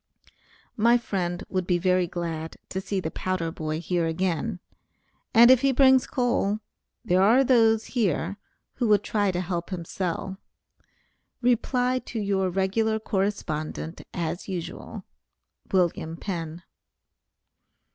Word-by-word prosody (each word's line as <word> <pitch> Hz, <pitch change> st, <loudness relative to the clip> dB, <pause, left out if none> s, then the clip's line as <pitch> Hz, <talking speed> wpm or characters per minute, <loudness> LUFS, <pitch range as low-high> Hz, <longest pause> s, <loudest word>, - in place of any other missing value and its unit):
My 235 Hz, +2 st, +5 dB
friend 180 Hz, -6 st, -3 dB
would 185 Hz, -2 st, -2 dB
be 180 Hz, -, +3 dB
very 180 Hz, 0 st, +2 dB
glad 165 Hz, -2 st, -5 dB
to 190 Hz, -, -3 dB
see 195 Hz, 0 st, -2 dB
the 160 Hz, -3 st, -4 dB
powder 185 Hz, -3 st, -2 dB
boy 155 Hz, -1 st, -3 dB
here 170 Hz, 0 st, 0 dB
again, 180 Hz, +4 st, -1 dB, 0.7 s
and 235 Hz, +2 st, +8 dB
if 260 Hz, -2 st, +6 dB
he 275 Hz, -1 st, +3 dB
brings 265 Hz, 0 st, +5 dB
coal, 240 Hz, -5 st, 0 dB, 0.5 s
there 180 Hz, +1 st, +3 dB
are 230 Hz, +7 st, +5 dB
those 225 Hz, -4 st, +4 dB
here, 200 Hz, -, -1 dB, 0.4 s
who 245 Hz, -, -1 dB
would 205 Hz, -1 st, +4 dB
try 205 Hz, -2 st, +1 dB
to 180 Hz, -1 st, -1 dB
help 175 Hz, -1 st, -3 dB
him 180 Hz, -3 st, -5 dB
sell. 190 Hz, +2 st, -3 dB, 1.0 s
Reply 250 Hz, +1 st, +2 dB
to 235 Hz, -, -6 dB
your 195 Hz, -2 st, 0 dB
regular 195 Hz, +4 st, +1 dB
correspondent 190 Hz, -6 st, -3 dB
as 175 Hz, 0 st, -3 dB
usual. 175 Hz, -3 st, -6 dB, 0.6 s
WM. 170 Hz, -3 st, 0 dB
PENN. 170 Hz, -3 st, -5 dB
190 Hz, 125 wpm, -26 LUFS, 175-220 Hz, 1.0 s, and